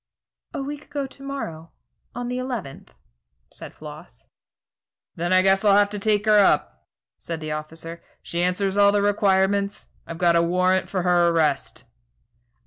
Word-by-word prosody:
"A 275 - -3
week 290 +1 -7
ago 290 -2 -4
to 270 +1 -13
morrow, 170 - -6 0.4
on 245 0 -4
the 250 +1 -3
eleventh," 245 - -6 0.6
said - - -10
Floss. - - -12 0.9
"Then 175 +2 -2
I 185 0 +5
guess 195 +1 +3
I'll 200 -1 +5
have 205 0 +3
to 210 - -4
take 210 0 +1
her 210 -1 +5
up," 200 - +1 0.3
said 165 -1 -5
the 155 -1 -5
officer; 165 +2 -7 0.2
"she 170 - -3
answers 190 +2 0
all 200 0 +6
the 205 0 +1
requirements. 200 0 +1 0.2
I've 165 - -7
got 170 -1 +3
a 170 - +4
warrant 185 +2 +1
for 185 -2 -2
her 175 -1 +3
arrest." 160 -4 0
190 Hz, 160 wpm, -23 LUFS, 170-210 Hz, 0.9 s, all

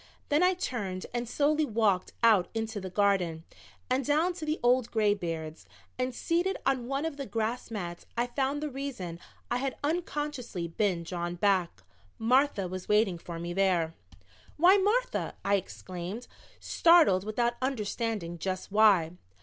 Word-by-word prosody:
Then 295 +2 +3
I 365 +1 +4
turned 200 - -3
and 240 -1 -2
slowly 300 +3 +2
walked 215 -8 +1
out 215 -6 +5
into 220 -2 -3
the 190 - -5
garden 180 -4 +1 0.4
and 260 +2 +1
down 310 +6 +2
to 330 -3 -6
the 305 +1 -1
old 245 -1 +3
graybeards. 170 -8 -1 0.3
And 255 0 0
seated 350 +7 0
on 260 -3 +1
one 275 +3 -1
of 320 -3 -4
the 275 -2 -5
grass 230 +2 -2
mats 175 -6 -6
I 240 - +2
found 270 +4 -1
the 300 - -2
reason 245 -11 -5 0.3
I - - +2
had 270 +1 -3
unconsciously 295 - -2
been 175 0 0
drawn 175 0 -4
back. 180 - +1 0.3
Martha 245 -3 +2
was 185 0 -7
waiting 210 -4 +3
for 170 0 -7
me 170 +1 -4
there. 175 -4 +2 0.6
"Why, 355 +5 +7
Martha," 440 +6 0
I 200 - +2
exclaimed, 185 +2 -4 0.3
startled 330 - +5
without 235 +3 0
understanding 220 -8 -2
just 185 +2 -4
why. 200 -6 +5
220 Hz, 150 wpm, -29 LUFS, 185-275 Hz, 0.6 s, Why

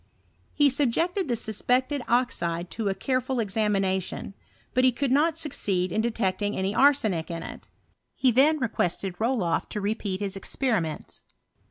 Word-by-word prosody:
He 290 -2 +4
subjected 330 - 0
the 240 - 0
suspected 250 +5 0
oxide 180 -9 0
to 220 -3 -2
a 195 - -1
careful 255 +1 -1
examination; 195 -3 -1 0.4
but 255 - +2
he 255 - +6
could 265 +2 -2
not 305 +4 +3
succeed 195 - -1
in 215 - +1
detecting 205 -3 -1
any 190 +1 -1
arsenic 220 - +3
in 165 -1 -4
it. - - -9 0.5
He 260 - +3
then 285 +6 +4
requested 195 - -2
RolofT 225 -7 0
to 210 - -4
repeat 205 -2 -2
his 200 -1 -3
experiments. 195 - -2
220 Hz, 145 wpm, -26 LUFS, 190-260 Hz, 0.5 s, he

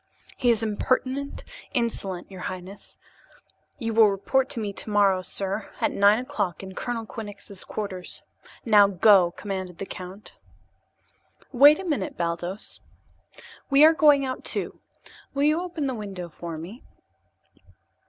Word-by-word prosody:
"He 250 - +1
is 230 -2 +3
impertinent, 255 +6 -1 0.3
insolent, 200 -7 -2
your 190 - -9
highness. 185 +2 -8 0.8
You 230 -3 -3
will 220 -1 +6
report 260 +7 0
to - - -4
me 205 -2 -3
tomorrow, 200 -3 +2
sir, 195 +3 -3
at - - +1
nine 205 +2 +5
o'clock 205 -7 -3
in 190 0 -8
Colonel 230 +2 -4
Quinnox's 205 -2 -9
quarters. 195 -4 -6 0.4
Now, 210 -3 +6
go!" 195 -1 +5
commanded 185 -1 -6
the 195 - -5
count. 190 +2 -10 1.1
"Wait 285 +4 +7
a 385 - -7
minute, 285 - -2
Baldos. 175 +3 -3 0.9
We 280 +2 +7
are 320 - +7
going 295 -3 +5
out, 255 -1 -4
too. - - -3 0.6
Will 280 - +1
you 305 +3 +3
open 350 -5 -4
that 265 - -1
window 195 -6 -6
for 165 0 -7
me?" 185 - -9
205 Hz, 135 wpm, -25 LUFS, 190-255 Hz, 1.1 s, Wait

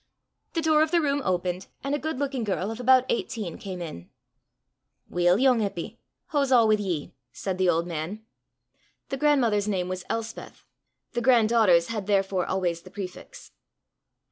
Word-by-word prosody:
The 330 - -1
door 310 -1 +4
of 315 - +3
the 345 - +3
room 285 -2 0
opened, 180 -1 -1 0.2
and 275 +1 -2
a 290 - 0
good 315 -2 -3
looking 270 -3 -2
girl 200 0 -2
of 225 - -7
about 255 +1 +5
eighteen 215 -6 -3
came 185 -3 -6
in. 90 - -9 1.0
"Weel, 175 +1 +3
yoong 255 -1 +4
Eppy, 205 +2 -4 0.3
hoo's 280 -3 +1
a' 240 -3 +6
wi' 215 - +4
ye?" 180 -7 -3 0.2
said 190 -1 -4
the 185 -1 +3
old 170 0 +2
man. 175 +6 -5 0.8
The 270 - -2
grandmother's 245 -9 +2
name 185 -3 -1
was 185 -1 -4
Elspeth, 225 0 -5 0.5
the 240 - -2
grand 235 -3 +4
daughter's 185 -8 +4
had 210 -4 -4
therefore 195 -3 +1
always 175 -3 -1
the 185 - -13
prefix. 185 -1 -9
210 Hz, 170 wpm, -26 LUFS, 180-255 Hz, 1.0 s, a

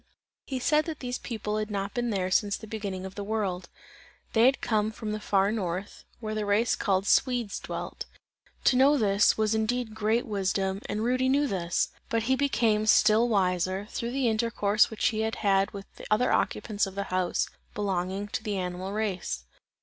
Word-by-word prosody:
He 265 - -3
said 300 +4 +2
that 320 -3 -5
these 250 -1 -4
people 215 -2 -3
had 215 0 -2
not 200 -1 -3
been 240 -1 -1
there 185 -3 -1
since 200 +1 +2
the 220 - -10
beginning 205 -4 -5
of 190 - -7
the 205 - -5
world; 195 -4 -2 0.6
they 230 +2 +6
had 270 - +3
come 215 -1 0
from 215 0 -5
the 215 - -3
far 200 -1 +2
North, 190 -2 -4
where 215 -2 -4
the 215 0 -1
race 205 +3 +2
called 195 -1 0
Swedes, 245 -3 +2
dwelt. - - -6 0.6
To - - +4
know 275 +3 +5
this, 205 -3 +3
was 215 0 +1
indeed 220 +1 -1
great 220 +2 +1
wisdom, 195 -1 -1
and 210 +2 -2
Rudy 255 +2 +1
knew 285 +2 +3
this; 180 -8 0 0.2
but 230 -1 0
he 260 +3 +2
became 225 -6 +1
still 215 +2 +5
wiser, 185 -1 +1
through 235 - -3
the 270 -2 +1
intercourse 220 -2 +2
which 220 - -3
he 220 -3 -3
had 200 -3 +1
with 200 -1 -8
the - - -9
other 215 +4 +3
occupants 210 -3 0
of 190 - -9
the 200 - -1
house 185 -1 +1 0.3
belonging 195 0 -2
to - - -3
the 210 -3 -2
animal 185 +1 -4
race. 190 - -2
210 Hz, 190 wpm, -28 LUFS, 195-230 Hz, 0.6 s, they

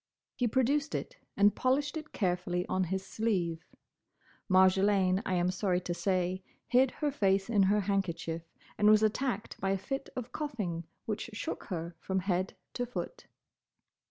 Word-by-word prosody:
He 245 - 0
produced 275 +6 +1
it - - -4 0.2
and 205 +1 +6
polished 280 +3 +1
it 310 -1 -6
carefully 180 -2 0
on 185 0 0
his 190 +2 -2
sleeve. 180 -7 -1 0.9
Marjolaine, 190 0 +4
I 185 - +1
am 175 +1 +2
sorry 185 -1 +1
to 175 - -3
say, 185 0 0 0.2
hid 255 +2 +4 0.2
her 290 - +2
face 195 -4 +1
in 205 -3 +4
her 205 +2 +4
handkerchief, 180 -4 -1 0.4
and 210 - +6
was 215 0 +6
attacked 220 0 -1
by 195 - 0
a 195 - +2
fit 270 +8 -4
of 250 -2 -5
coughing 210 - -3 0.2
which 215 +1 -3
shook 210 - -4
her 170 -2 -4
from 190 +2 -1
head 185 0 -1 0.2
to 245 - -1
foot. 475 - -6
195 Hz, 155 wpm, -31 LUFS, 185-235 Hz, 0.9 s, and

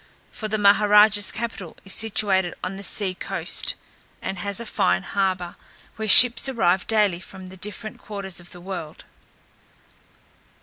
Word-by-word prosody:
For 215 - -6
the 215 0 -2
Maha 205 0 +4
raja's 210 -1 +5
capital 220 -7 -6
is 195 - -3
situated 200 -5 0
on 190 - -4
the 195 - -9
sea 195 -1 -2
coast, - - -2 0.4
and 190 - -5
has 200 +2 -3
a 235 - -6
fine 90 - 0
harbour, 185 -3 -2 0.4
where 220 0 -5
ships 240 +5 +7
arrive 190 -7 0
daily 210 -5 +2
from 190 0 -11
the 190 - -13
different 210 +3 -6
quarters 195 -4 -4
of 175 - -14
the 175 - -11
world. 175 -4 -8
200 Hz, 155 wpm, -23 LUFS, 185-215 Hz, 0.4 s, ships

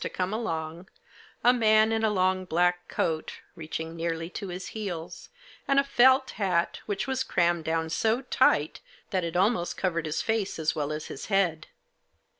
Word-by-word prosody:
to - - -2
come 185 +2 -2
along, 165 -5 -4 0.6
a 245 - +6
man 220 -2 +4
in 225 0 0
a 220 - +4
long 185 -2 +1
black 180 0 +1
coat, 160 -1 -2
reaching 160 +1 -6
nearly 165 0 -3
to 200 - -6
his 180 +1 -6
heels, 180 -5 -6 0.4
and 275 0 +4
a - - +4
felt 260 0 +4
hat, 180 -3 +1
which 205 -2 -2
was 265 0 -1
crammed 175 -7 +1
down 160 0 0
so 220 +9 0
tight, 155 - +2 0.3
that 185 -2 0
it 170 0 -4
almost 185 -2 +1
covered 170 -3 -1
his 155 - -2
face 225 -3 -1
as 160 0 0
well 150 -2 -2
as 155 0 -4
his - - -8
head. 180 -6 +1
180 Hz, 175 wpm, -27 LUFS, 165-220 Hz, 0.6 s, a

